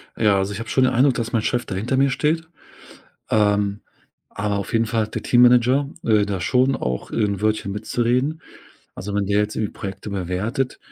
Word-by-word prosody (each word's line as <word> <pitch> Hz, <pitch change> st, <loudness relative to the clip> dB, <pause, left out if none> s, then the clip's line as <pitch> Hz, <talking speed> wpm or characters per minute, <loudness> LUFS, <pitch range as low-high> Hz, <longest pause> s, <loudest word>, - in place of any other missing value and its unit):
Ja, 105 Hz, -3 st, +3 dB
also, 95 Hz, +1 st, -1 dB
ich 100 Hz, -, -6 dB
habe 115 Hz, -1 st, -6 dB
schon 130 Hz, -, +2 dB
den 130 Hz, -, +1 dB
Eindruck, 130 Hz, +1 st, +3 dB
dass 115 Hz, -1 st, -3 dB
mein 115 Hz, -, +2 dB
Chef 120 Hz, +3 st, -1 dB
da 95 Hz, -, -5 dB
hinter 115 Hz, +7 st, -1 dB
mir 135 Hz, +1 st, +4 dB
steht. 160 Hz, +5 st, 0 dB, 0.8 s
Ähm, 105 Hz, -1 st, +1 dB, 0.5 s
aber 100 Hz, 0 st, -2 dB
auf 100 Hz, -, -5 dB
jeden 115 Hz, 0 st, +3 dB
Fall 110 Hz, 0 st, 0 dB
hat 110 Hz, -, -8 dB
der -, -, -3 dB
Teammanager, 125 Hz, +3 st, +4 dB
äh, 105 Hz, -2 st, +3 dB
da 100 Hz, -2 st, -3 dB
schon 130 Hz, +8 st, +2 dB
auch 65 Hz, -, -4 dB
'n 100 Hz, -3 st, -1 dB
Wörtchen 110 Hz, -2 st, 0 dB
mitzureden. 125 Hz, +8 st, -1 dB, 0.5 s
Also, 100 Hz, +2 st, -6 dB
wenn 100 Hz, -1 st, 0 dB
der 100 Hz, +1 st, +1 dB
jetzt 105 Hz, 0 st, -2 dB
irgendwie 105 Hz, -2 st, -2 dB
Projekte 100 Hz, +2 st, -7 dB
bewertet 100 Hz, +7 st, -2 dB
110 Hz, 200 wpm, -22 LUFS, 100-125 Hz, 0.8 s, mir